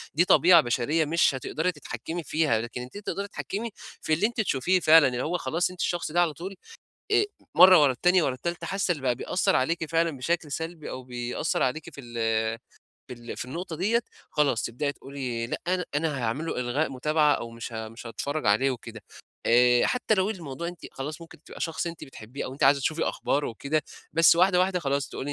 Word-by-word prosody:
دي 170 +4 +4
طبيعة 175 -2 +7
بشرية 130 +6 0
مش 155 -3 +2
هتقدري 160 +7 -1
تتحكّمي 155 +3 -6
فيها، 150 -6 +1
لكن 120 +1 -6
أنتِ 125 +11 -9
تقدري 200 -1 -4
تتحكّمي 215 +3 -5 0.3
في 155 - 0
اللي 170 +7 +3
أنتِ 235 -1 -2
تشوفيه 185 0 +1
فعلًا 160 -3 +7
اللي 125 0 -2
هو 175 +3 -1
خلاص 165 +5 0
أنتِ 180 - -13
الشخص 175 -3 -1
ده 175 +1 +3
على 165 -3 +1
طول 190 +5 -7 0.6
آآ 410 0 +5 0.3
مرّة 185 -3 +9
ورا 140 - +5
التانية 180 +6 +3
ورا 130 - 0
التالتة 170 +6 -4
حاسّة 195 -1 0
اللي 150 - -9
بقى 125 -2 +1
بيأثّر 185 +9 0
عليكِ 160 +5 0
فعلًا 165 -3 +1
بشكل 160 +3 -2
سلبي 160 +1 -5
أو 130 - -7
بيأثّر 125 -1 -2
عليكِ 140 +5 -2
في 140 - -9
ال 120 -2 -12 0.9
في - - -6
ال 120 0 -9
في - - -3
النقطة 165 +4 -5
ديّة، 220 +8 +1 0.3
خلاص 140 -6 +1
تبدئي 145 +5 -2
تقولي 130 -5 -5
لأ - - -3
أن 180 0 +1
أنا 150 -2 0
هاعمل 120 +7 -2
له - - -3
إلغاء 130 +5 -1
متابعة 150 +3 +2
أو 115 - -5
مش 115 0 -8
ها 110 0 -5
مش 115 +2 -11
هاتفرّج 145 +4 -3
عليه 110 +7 +3
وكده. 115 -3 -7 0.4
آآ 120 +1 +5
حتّى 250 -3 +1
لو 190 +1 +1
الموضوع 170 -4 -5
أنتِ 175 -2 -9
خلاص 150 +5 -6
ممكن 165 -2 -14
تبقى - - -12
شخص 165 +1 -2
أنتِ 170 -1 -6
بتحبيه 125 0 -8
أو 130 - -6
أنتِ 140 - -6
عايزة 140 +1 +5
تشوفي 155 +4 -1
أخباره 145 +1 -1
وكده، 140 +7 -2 0.3
بس 165 +1 +6
واحدة، 180 0 +4
واحدة 185 -1 +1
خلاص 140 -2 -1
تقولي 145 +2 -5
150 Hz, 205 wpm, -26 LUFS, 130-175 Hz, 0.9 s, مرّة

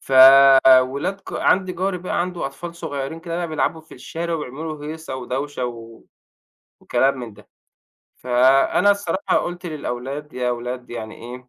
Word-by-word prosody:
ف 135 - -9 0.7
ولاد 140 +10 -3
جَا - - -4
عندي 185 -1 +2
جَاري 185 0 -2
بقى 180 - -2
عنده 175 -3 -3
أطفال 170 +5 -8
صغيرين 160 -1 -5
كده 170 0 -5
بقى 175 -1 -3
بيلعبوا 160 +1 -1
في 160 - -16
الشارع 165 +6 -5
وبيعملوا 155 +2 -5
له 145 - -11
هيصة 160 -4 -7
ودوشة 130 +1 -4
و 115 -1 -10 0.8
وكلام 135 0 +1
من 115 -4 -8
ده. 105 - -19 0.7
فأنا 130 +10 +3
الصراحة 200 -1 0
قُلت 175 +1 -3
للأولاد 145 -1 -5
يا 125 -1 -2
أولاد 125 +1 -5
يعني 110 -2 -7
إيه 125 +2 -10
145 Hz, 155 wpm, -21 LUFS, 125-170 Hz, 0.8 s, فأنا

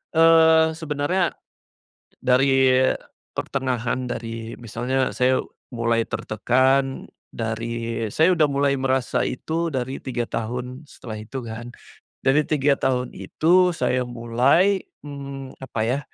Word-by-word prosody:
eee, 160 0 +6
sebenarnya, 160 +3 -1 0.8
dari 130 0 +4 0.6
pertengahan 125 -2 -2
dari, 115 -1 -5
misalnya 125 +3 -1
saya 130 +1 +3 0.3
mulai 115 -1 +1
tertekan, 130 +4 +1 0.2
dari, 115 0 -3
saya 165 - +4
udah 155 -3 +4
mulai 140 0 +2
merasa 130 -1 0
itu 165 +5 -2
dari 130 0 -4
3 120 -3 -3
tahun 125 +4 -4
setelah 115 -6 -9
itu 130 +5 -6
kan. 115 +2 -7 0.5
Dari 135 +3 +4
3 145 -2 +2
tahun 125 -2 -1
itu 180 +3 +3
saya 130 -5 0
mulai, 125 +11 +2 0.2
mmm, 140 -2 -8
apa 120 -4 -4
ya, 130 +4 +1
130 Hz, 110 wpm, -23 LUFS, 120-145 Hz, 0.8 s, eee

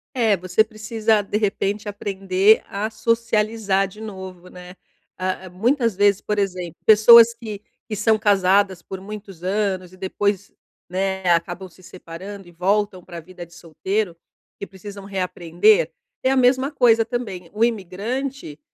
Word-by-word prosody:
É, 225 -5 +3
você 185 +3 +1
precisa, 215 0 0
de 205 +1 -2
repente, 205 0 -1
aprender 195 0 +2
a 205 +2 -3
socializar 220 -3 0
de 210 +3 -14
novo, 190 -4 -9
né? 180 0 -12 0.4
A 185 0 -3
a - - -9
muitas 230 +4 0
vezes, 205 0 +3
por 210 - -2
exemplo, 180 -4 -3
pessoas 230 +2 +8
que 220 -3 -8 0.3
que 215 - -3
são 215 +1 +2
casadas 195 -2 +2
por 190 - -8
muitos 195 -3 -10
anos 190 -2 -1
e - - -15
depois, 195 +1 -2 0.4
né, 190 +1 -2
acabam 175 +2 -1
se 180 - -21
separando 185 +2 -10
e 175 - -15
voltam 195 +2 0
pra 170 -1 -9
vida 175 +1 -11
de 170 - -21
solteiro, 180 +4 -3 0.5
que 200 - -6
precisam 200 +1 -10
reaprender, 185 - +1 0.3
é 260 - +1
a - - +2
mesma 260 +1 +3
coisa 235 -6 +3
também. 205 -8 -5
O 215 +2 0
imigrante, 230 - -3
200 Hz, 150 wpm, -21 LUFS, 185-220 Hz, 0.5 s, pessoas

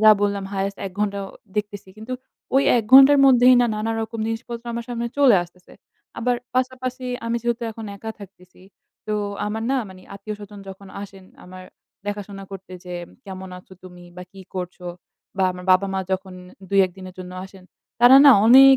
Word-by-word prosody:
ওয়া 215 0 +8
বললাম 200 -1 0
highest 195 0 -2
১ 185 - -8
ঘণ্টা 200 -1 0 0.4
দেখতেছি 205 -2 -4
কিন্তু 220 +4 -8 0.4
ওই 270 - +5
১ 230 - +1
ঘণ্টার 275 +2 +9
মধ্যেই 255 -1 +7
না, 245 - +3
নানা 220 +2 -2
রকম 225 +1 -6
জিনিসপত্র 230 +1 -5
আমার 235 0 -4
সামনে 235 -1 -3
চলে 255 -8 +6
আসতেছে। 180 +1 -16 0.5
আবার 245 +1 +1 0.2
পাশাপাশি 255 0 -2 0.2
আমি 230 0 0
যেহেতু 235 0 -1
এখন 225 0 -9
একা 220 +3 -6
থাকতেছি। 185 -2 -15 0.5
তো 215 - -1 0.3
আমার 220 +2 -3
না 270 - +2
মানে 185 -1 -13
আত্মীয়-স্বজন 205 0 -8
যখন 195 0 -11
আসেন 195 -2 -11 0.2
আমার 185 0 -11 0.4
দেখাশোনা 205 -1 -5
করতে 190 -1 -10
যে, 180 0 -7 0.3
"কেমন 190 -1 -8
আছো 180 - -18
তুমি 180 -1 -13
বা 180 - -7
কী 195 - -12
করছো?" 180 -1 -6 0.5
বা 190 - +2
আমার 180 0 -10
বাবা-মা 190 +1 +1
যখন 190 0 -3 0.3
২,১ 195 -2 +3
দিনের 185 -1 -10
জন্য 180 0 -8
আসেন 190 -1 -14 0.4
তারা 245 +2 +9
না 280 - +10
অনেক 270 +3 +9
205 Hz, 175 wpm, -22 LUFS, 190-235 Hz, 0.5 s, না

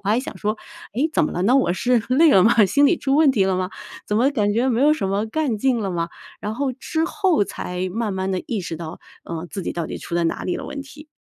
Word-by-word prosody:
我 200 - -4
还 220 +3 +3
想 260 - -6
说， 215 +1 -1 0.4
诶， 275 +7 +1
怎 - - +2
么 - - -2
了 175 - -2
呢？ 230 +7 +4
我 265 -10 +3
是 245 +5 +2
累 300 +6 +5
了 190 - +6
吗？ 220 0 +5
心 285 +9 +4
里 345 - +3
出 270 -1 0
问 300 -1 +5
题 210 -7 +2
了 190 -1 +1
吗？ 185 0 -2 0.4
怎 210 - 0
么 250 +5 +3
感 210 -7 +1
觉 245 +4 +2
没 235 0 +1
有 295 +2 +5
什 195 - -2
么 200 +3 0
干 250 -1 -1
劲 255 +1 +2
了 195 -3 -2
吗？ 170 -1 -2 0.3
然 210 +1 -4
后 270 +2 -1
之 315 +5 -2
后 365 - +1
才 180 -1 -4
慢 220 0 -2
慢 190 0 -2
地 185 - -2
意 225 -4 -2
识 165 - -5
到， 165 +1 -8 0.2
呃， 165 +1 -5
自 195 -3 -5
己 - - -3
到 170 -2 -3
底 - - -6
出 - - -7
在 170 -1 +1
哪 165 - -1
里 180 - -1
了 - - -6
问 280 - -6
题。 295 +2 -12
220 Hz, 300 characters per minute, -22 LUFS, 190-275 Hz, 0.4 s, 了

